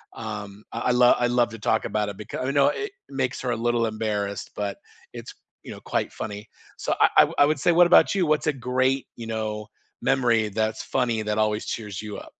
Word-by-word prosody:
um, 105 Hz, -2 st, -7 dB
I 115 Hz, +2 st, -1 dB
lo 125 Hz, 0 st, +5 dB
I 120 Hz, -, +2 dB
love 120 Hz, -1 st, +2 dB
to 115 Hz, -, -9 dB
talk -, -, +1 dB
about 105 Hz, -1 st, -1 dB
it 100 Hz, -, -8 dB
beca 105 Hz, +4 st, -5 dB
you 135 Hz, -, 0 dB
know, 140 Hz, -1 st, +4 dB
it 415 Hz, 0 st, -4 dB, 0.2 s
makes 130 Hz, -2 st, -2 dB
her 125 Hz, -2 st, -1 dB
a 120 Hz, -, -1 dB
little 120 Hz, -1 st, +2 dB
embarrassed, 105 Hz, -2 st, -3 dB
but 100 Hz, -1 st, -3 dB, 0.4 s
it's, -, -, -8 dB, 0.3 s
you -, -, -9 dB
know, -, -, -10 dB
quite -, -, 0 dB
funny. 105 Hz, -1 st, -5 dB, 0.4 s
So -, -, +1 dB
I -, -, +6 dB
I -, -, +10 dB
wou -, -, -8 dB
I 145 Hz, -, +8 dB
would 150 Hz, -1 st, 0 dB
say, 175 Hz, -, +3 dB
what 175 Hz, +1 st, +6 dB
about -, -, +6 dB
you? 185 Hz, -, +2 dB
What's 155 Hz, 0 st, +1 dB
a 150 Hz, -, +3 dB, 0.2 s
great, 130 Hz, +1 st, +1 dB
you 115 Hz, -, -6 dB
know, 105 Hz, -1 st, -3 dB, 0.4 s
memory, 120 Hz, -5 st, +2 dB
that's 110 Hz, +2 st, -2 dB
funny, 120 Hz, -4 st, 0 dB
that 105 Hz, 0 st, -2 dB
always 105 Hz, 0 st, 0 dB
cheers 105 Hz, -4 st, -5 dB
you 105 Hz, -2 st, -7 dB
up? -, -, -11 dB
115 Hz, 225 wpm, -25 LUFS, 105-130 Hz, 0.4 s, I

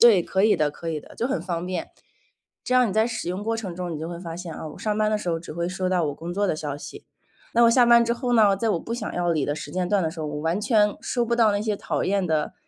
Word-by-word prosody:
对， 220 Hz, -7 st, +7 dB
可 190 Hz, +3 st, 0 dB
以 215 Hz, -, +5 dB
的 150 Hz, -1 st, +1 dB
可 165 Hz, +3 st, -6 dB
以 155 Hz, -2 st, -2 dB
的。 -, -, -15 dB
就 240 Hz, -, -1 dB
很 175 Hz, -, -1 dB
方 175 Hz, -1 st, -3 dB
便。 180 Hz, -2 st, -4 dB, 0.7 s
这 255 Hz, -, 0 dB
样 250 Hz, -2 st, +5 dB
你 -, -, -4 dB
在 220 Hz, +2 st, +3 dB
使 220 Hz, -7 st, -4 dB
用 185 Hz, +3 st, -3 dB
过 225 Hz, +1 st, 0 dB
程 195 Hz, -6 st, -5 dB
中 180 Hz, 0 st, -4 dB
你 150 Hz, -, -5 dB
就 160 Hz, -, -4 dB
会 170 Hz, -1 st, -6 dB
发 165 Hz, -2 st, -6 dB
现， 175 Hz, -2 st, -7 dB
哦， 155 Hz, -, -6 dB
我 -, -, -13 dB
上 210 Hz, -1 st, -1 dB
班 215 Hz, 0 st, +2 dB
的 215 Hz, -, +1 dB
时 180 Hz, -4 st, -4 dB
候 165 Hz, -, 0 dB
只 165 Hz, -, -9 dB
会 170 Hz, +1 st, -2 dB
收 185 Hz, 0 st, -2 dB
到 180 Hz, -2 st, +2 dB
我 145 Hz, -, -2 dB
工 170 Hz, +2 st, -6 dB
作 205 Hz, +1 st, +1 dB
的 160 Hz, -, 0 dB
消 145 Hz, -2 st, -4 dB
息。 415 Hz, -, -10 dB, 0.5 s
那 235 Hz, -, +5 dB
我 230 Hz, -, +7 dB
下 245 Hz, 0 st, +5 dB
班 235 Hz, 0 st, +6 dB
之 235 Hz, -, +1 dB
后 245 Hz, 0 st, -2 dB
呢， 210 Hz, -4 st, +5 dB
在 225 Hz, +3 st, -1 dB
我 170 Hz, -, 0 dB
不 230 Hz, -, -5 dB
想 240 Hz, -, -4 dB
要 175 Hz, -1 st, 0 dB
理 155 Hz, -4 st, 0 dB
的 145 Hz, -, -1 dB
时 -, -, -7 dB
间 180 Hz, -1 st, -1 dB
段 200 Hz, -4 st, +2 dB
的 160 Hz, -, -1 dB
时 165 Hz, -, -10 dB
候， 155 Hz, -, -3 dB
我 150 Hz, 0 st, -4 dB
完 165 Hz, +5 st, 0 dB
全 210 Hz, -2 st, +3 dB
收 240 Hz, -2 st, -1 dB
不 235 Hz, 0 st, 0 dB
到 225 Hz, -3 st, +4 dB
那 205 Hz, 0 st, 0 dB
些 215 Hz, -1 st, -1 dB
讨 -, -, -2 dB
厌 195 Hz, -1 st, +1 dB
的， 155 Hz, -2 st, 0 dB
185 Hz, 345 characters per minute, -24 LUFS, 165-220 Hz, 0.7 s, 对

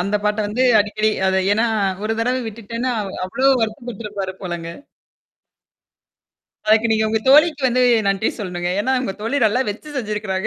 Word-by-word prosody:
அந்த 200 Hz, +3 st, 0 dB
பாட்ட 210 Hz, +1 st, 0 dB
வந்து 220 Hz, +5 st, -1 dB, 0.2 s
அடிக்கடி 215 Hz, +1 st, 0 dB, 0.2 s
அது 190 Hz, 0 st, +2 dB
ஏன்னா 220 Hz, +3 st, +2 dB, 0.4 s
ஒரு 220 Hz, -, 0 dB
தடவை 250 Hz, +2 st, 0 dB
விட்டுட்டேன்னா 230 Hz, +3 st, -4 dB, 0.3 s
அவ்வளோ 255 Hz, +9 st, -1 dB
வருத்தப்பட்டுருப்பாரு 215 Hz, -3 st, -4 dB
போலங்க. 175 Hz, -2 st, -5 dB, 2.0 s
அதுக்கு 220 Hz, +1 st, +3 dB
நீங்க 220 Hz, 0 st, +2 dB
உங்க 220 Hz, -, +1 dB
தோழிக்கு 300 Hz, +1 st, +5 dB
வந்து 250 Hz, +1 st, +1 dB, 0.3 s
நன்றி 195 Hz, +2 st, +1 dB
சொல்லனுங்க. 175 Hz, -3 st, -3 dB
ஏன்னா 260 Hz, +5 st, 0 dB
உங்க 195 Hz, -, -3 dB
தோழி 230 Hz, +6 st, -1 dB
நல்லா 220 Hz, +5 st, +1 dB
வெச்சு 295 Hz, +8 st, -9 dB
செஞ்சிருக்கிறாங்க. 210 Hz, -4 st, -3 dB
215 Hz, 145 wpm, -20 LUFS, 200-245 Hz, 2.0 s, தோழிக்கு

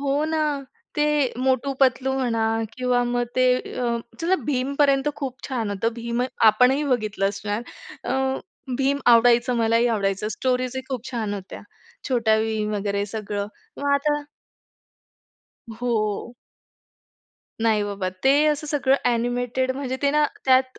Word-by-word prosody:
हो 285 Hz, +2 st, 0 dB
ना, 315 Hz, 0 st, 0 dB, 0.5 s
ते 295 Hz, -, +3 dB, 0.3 s
'मोटू-पतलू' 265 Hz, 0 st, +1 dB
म्हणा 230 Hz, -3 st, 0 dB, 0.3 s
किंवा 250 Hz, -1 st, +1 dB
मग 245 Hz, 0 st, 0 dB
ते 255 Hz, 0 st, +4 dB, 0.3 s
अ, 235 Hz, -1 st, 0 dB, 0.2 s
चला 350 Hz, +3 st, +2 dB
भीमपर्यंत 275 Hz, +1 st, +2 dB
खूप 265 Hz, -3 st, -4 dB
छान 230 Hz, -6 st, -2 dB
होतं. 225 Hz, +4 st, -1 dB
भीम 235 Hz, +1 st, -2 dB, 0.2 s
आपणही 250 Hz, +7 st, +5 dB
बघितलं 215 Hz, -7 st, 0 dB
असणार. 205 Hz, +2 st, -3 dB, 0.4 s
अ, -, -, -1 dB, 0.6 s
भीम 275 Hz, +1 st, +1 dB
आवडायचं, 240 Hz, +1 st, +5 dB
मलाही 230 Hz, +1 st, +3 dB
आवडायचं. 205 Hz, -2 st, 0 dB
स्टोरीज 255 Hz, +1 st, -1 dB
ही 260 Hz, -, -3 dB
खूप 255 Hz, -2 st, -5 dB
छान 220 Hz, -4 st, -2 dB
होत्या, 190 Hz, -1 st, -8 dB, 0.5 s
छोटा 225 Hz, -4 st, +3 dB
भीम 215 Hz, -1 st, -1 dB
वगैरे 200 Hz, 0 st, -1 dB
सगळं 205 Hz, -1 st, -4 dB, 0.3 s
मग 285 Hz, 0 st, +1 dB
आता 295 Hz, +1 st, +1 dB, 1.6 s
हो. 230 Hz, -1 st, -1 dB, 1.3 s
नाही 220 Hz, -2 st, +3 dB
बाबा, 200 Hz, -2 st, -3 dB, 0.2 s
ते 270 Hz, -, +6 dB, 0.2 s
असं 300 Hz, +1 st, -3 dB
सगळं 275 Hz, -2 st, +2 dB
अ‍ॅनिमेटेड 245 Hz, +2 st, 0 dB
म्हणजे 260 Hz, -2 st, -3 dB
ते 280 Hz, -, +3 dB
ना, 300 Hz, 0 st, +3 dB, 0.2 s
त्यात 260 Hz, 0 st, +3 dB
245 Hz, 130 wpm, -23 LUFS, 220-265 Hz, 1.6 s, ते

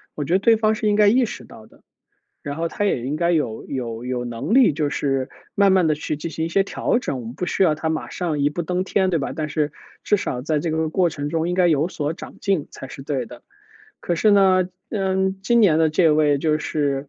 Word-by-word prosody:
我 150 Hz, -, -3 dB
觉 160 Hz, -, -2 dB
得 190 Hz, -, +4 dB
对 225 Hz, +3 st, +4 dB
方 215 Hz, 0 st, +2 dB
是 215 Hz, -, -2 dB
应 205 Hz, -, +3 dB
该 210 Hz, 0 st, +5 dB
意 250 Hz, +4 st, +4 dB
识 -, -, -8 dB
到 -, -, -14 dB
的。 -, -, -23 dB, 0.6 s
然 145 Hz, -3 st, -5 dB
后 165 Hz, +1 st, -1 dB
他 205 Hz, -, -3 dB
也 165 Hz, -12 st, 0 dB
应 140 Hz, -, -2 dB
该 170 Hz, +2 st, +1 dB
有 150 Hz, -10 st, -1 dB
有 120 Hz, -3 st, -5 dB
有 125 Hz, -1 st, -3 dB
能 120 Hz, -, -4 dB
力 255 Hz, -, +6 dB
就 145 Hz, 0 st, -1 dB
是 135 Hz, -3 st, -1 dB, 0.2 s
慢 200 Hz, -1 st, +4 dB
慢 185 Hz, -3 st, +4 dB
地 155 Hz, -, +2 dB
去 150 Hz, 0 st, -4 dB
进 150 Hz, +3 st, -5 dB
行 160 Hz, 0 st, -3 dB
一 -, -, -2 dB
些 195 Hz, +3 st, +2 dB
调 235 Hz, -, 0 dB
整， 140 Hz, -, -4 dB
我 -, -, -9 dB
们 115 Hz, +2 st, -7 dB
不 180 Hz, -, -3 dB
需 195 Hz, -, 0 dB
要 160 Hz, -5 st, +3 dB
他 160 Hz, +1 st, -2 dB
马 160 Hz, 0 st, -3 dB
上 165 Hz, -5 st, -2 dB
一 145 Hz, +1 st, +2 dB
步 170 Hz, +3 st, -3 dB
登 180 Hz, +2 st, -1 dB
天 190 Hz, 0 st, +1 dB
对 165 Hz, -4 st, 0 dB
吧？ 135 Hz, -, -3 dB
但 155 Hz, -1 st, -2 dB
是 150 Hz, -1 st, -1 dB, 0.3 s
至 210 Hz, -, +2 dB
少 125 Hz, -10 st, -3 dB
在 155 Hz, +2 st, 0 dB
这 160 Hz, +2 st, -2 dB
个 160 Hz, 0 st, 0 dB
过 175 Hz, +2 st, +2 dB
程 145 Hz, -2 st, -4 dB
中 165 Hz, +2 st, -1 dB
应 180 Hz, -, -1 dB
该 180 Hz, -1 st, +3 dB
有 155 Hz, -1 st, +2 dB
所 150 Hz, -4 st, -3 dB
长 -, -, -11 dB
进 195 Hz, -7 st, 0 dB
才 135 Hz, -, -9 dB
是 135 Hz, -, -9 dB
对 135 Hz, -3 st, -3 dB
的。 -, -, -13 dB, 0.6 s
可 175 Hz, -, -1 dB
是 170 Hz, +6 st, +2 dB
呢， 190 Hz, -3 st, +4 dB, 0.2 s
嗯， 190 Hz, -2 st, 0 dB
今 235 Hz, +4 st, +3 dB
年 165 Hz, -7 st, +4 dB
的 160 Hz, -1 st, +3 dB
这 160 Hz, +1 st, +3 dB
位 150 Hz, -1 st, +3 dB
就 155 Hz, +1 st, 0 dB
是，， 145 Hz, -2 st, -2 dB
160 Hz, 280 characters per minute, -22 LUFS, 145-190 Hz, 0.6 s, 力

